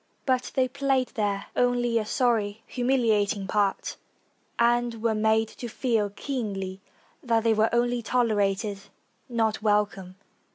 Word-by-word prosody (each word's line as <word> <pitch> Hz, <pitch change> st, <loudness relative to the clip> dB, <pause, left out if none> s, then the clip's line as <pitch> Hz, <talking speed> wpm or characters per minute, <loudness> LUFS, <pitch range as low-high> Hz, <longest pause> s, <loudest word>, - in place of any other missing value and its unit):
But 255 Hz, -2 st, 0 dB
they 260 Hz, -1 st, +3 dB
played 270 Hz, -1 st, 0 dB
there 205 Hz, -4 st, -2 dB
only 245 Hz, -1 st, +2 dB
a 215 Hz, -, -4 dB
sorry, 225 Hz, -4 st, 0 dB
humiliating 225 Hz, -6 st, +1 dB
part, 200 Hz, 0 st, 0 dB, 0.6 s
and 240 Hz, -1 st, +2 dB
were 230 Hz, -1 st, +2 dB
made 220 Hz, +1 st, +2 dB
to 240 Hz, -, -7 dB
feel 225 Hz, -3 st, 0 dB
keenly 200 Hz, -5 st, -4 dB, 0.4 s
that 230 Hz, -2 st, +1 dB
they 225 Hz, -1 st, +4 dB
were 220 Hz, +1 st, +3 dB
only 240 Hz, 0 st, +1 dB
tolerated, 210 Hz, -4 st, 0 dB, 0.5 s
not 225 Hz, -3 st, 0 dB
welcome. 205 Hz, -3 st, 0 dB
225 Hz, 125 wpm, -26 LUFS, 205-245 Hz, 0.6 s, they